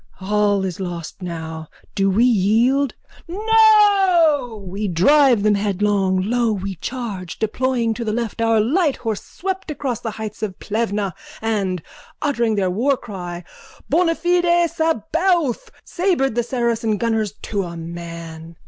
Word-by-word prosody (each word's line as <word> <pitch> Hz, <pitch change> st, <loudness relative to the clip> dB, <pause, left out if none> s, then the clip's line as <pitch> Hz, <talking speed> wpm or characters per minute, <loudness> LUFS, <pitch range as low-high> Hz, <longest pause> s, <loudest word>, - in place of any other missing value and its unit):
All 205 Hz, 0 st, +1 dB
is 185 Hz, -2 st, -4 dB
lost 175 Hz, -1 st, -6 dB
now! 160 Hz, -2 st, -6 dB, 0.3 s
Do 195 Hz, 0 st, +1 dB
we 205 Hz, +5 st, +3 dB
yield? 240 Hz, +5 st, +2 dB, 0.3 s
No! 380 Hz, -, +4 dB
We 200 Hz, +3 st, -3 dB
drive 240 Hz, -, +4 dB
them 210 Hz, 0 st, +4 dB
headlong! 200 Hz, -2 st, +1 dB
Lo! 235 Hz, +2 st, +1 dB
We 195 Hz, -1 st, -4 dB
charge! 195 Hz, -3 st, -5 dB
Deploying 235 Hz, +1 st, 0 dB
to 235 Hz, -, -5 dB
the 220 Hz, -, -1 dB
left 230 Hz, 0 st, -3 dB
our 225 Hz, -1 st, +3 dB
light 285 Hz, -, +2 dB
horse 225 Hz, -4 st, -3 dB
swept 380 Hz, 0 st, -5 dB
across 275 Hz, -6 st, -3 dB
the 225 Hz, -, -4 dB
heights 215 Hz, -1 st, -7 dB
of 205 Hz, -4 st, -3 dB
Plevna 210 Hz, -3 st, -2 dB, 0.3 s
and, 200 Hz, -6 st, -1 dB, 0.4 s
uttering 235 Hz, -7 st, 0 dB
their 190 Hz, -3 st, +1 dB
warcry 195 Hz, -7 st, -2 dB, 0.5 s
Bonafide 345 Hz, +1 st, +2 dB
Sabaoth, 325 Hz, -, 0 dB, 0.2 s
sabred 345 Hz, -, 0 dB
the 240 Hz, -, +1 dB
Saracen 235 Hz, -3 st, -1 dB
gunners 220 Hz, -2 st, 0 dB
to 205 Hz, -2 st, -2 dB
a 170 Hz, -2 st, -6 dB
man. 165 Hz, -1 st, -8 dB
220 Hz, 130 wpm, -20 LUFS, 195-280 Hz, 0.5 s, No